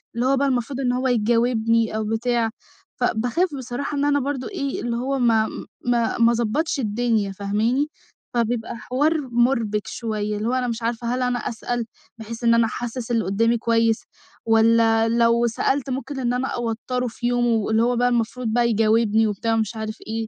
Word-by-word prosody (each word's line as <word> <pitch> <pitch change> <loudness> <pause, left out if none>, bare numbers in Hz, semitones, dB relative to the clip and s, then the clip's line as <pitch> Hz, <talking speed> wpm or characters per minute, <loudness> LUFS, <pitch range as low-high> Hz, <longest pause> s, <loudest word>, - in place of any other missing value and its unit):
اللي 240 - 0
هو 270 +1 +3
بقى 280 +1 +2
المفروض 255 0 -1
إن 250 -2 +1
هو 255 +1 0
يجاوبني 230 -1 +2
أو 220 - -1
بتاع، 225 +1 0 0.5
فباخاف 245 +9 0
بصراحة 265 +3 -4
إن 285 - +1
أنا 290 0 +3
برضه 270 -1 -3
إيه، 280 -9 -3
اللي 240 -1 -2
هو 270 +3 -1
ما 225 -3 +3 0.4
ما 235 -2 +1
ما 235 0 +5
اضبّطش 240 +7 0
الدنيا. 220 -3 0
فاهماني؟ 215 +8 0 0.5
فبيبقى 235 -1 -1
حوار 290 +8 +1
مُربِك 235 -4 +1
شويّة، 210 -2 -3
اللي 215 +2 -2
هو 245 - 0
أنا 255 -1 0
مش 235 0 -3
عارفة 235 +1 -2
هل 255 - -2
أنا 250 -1 0
أسأل، 240 0 -3 0.3
بحيث 230 +1 -8
إن 230 0 +5
أنا 230 0 +4
أحسس 240 +2 -4
اللي 230 -2 +1
قدّامي 230 +5 +2
كويّس؟ 230 -1 +1 0.4
والّا 225 0 +4
لو 235 0 +3
سألت 270 +4 -1
ممكن 270 +2 -4
إن 245 -1 0
أنا 250 +2 -1
أوتّره 240 +1 -2
في 240 +1 -4
يومه، 245 0 +1
واللي 220 +1 +1
هو 245 +1 +2
بقى 245 +1 +2
المفروض 240 +1 -1
بقى 235 +2 +2
يجاوبني 220 0 +3
وبتاع 215 +2 -1
ومش 225 0 -1
عارف 220 0 -5
إيه، 225 0 -3
235 Hz, 180 wpm, -22 LUFS, 225-250 Hz, 0.5 s, ما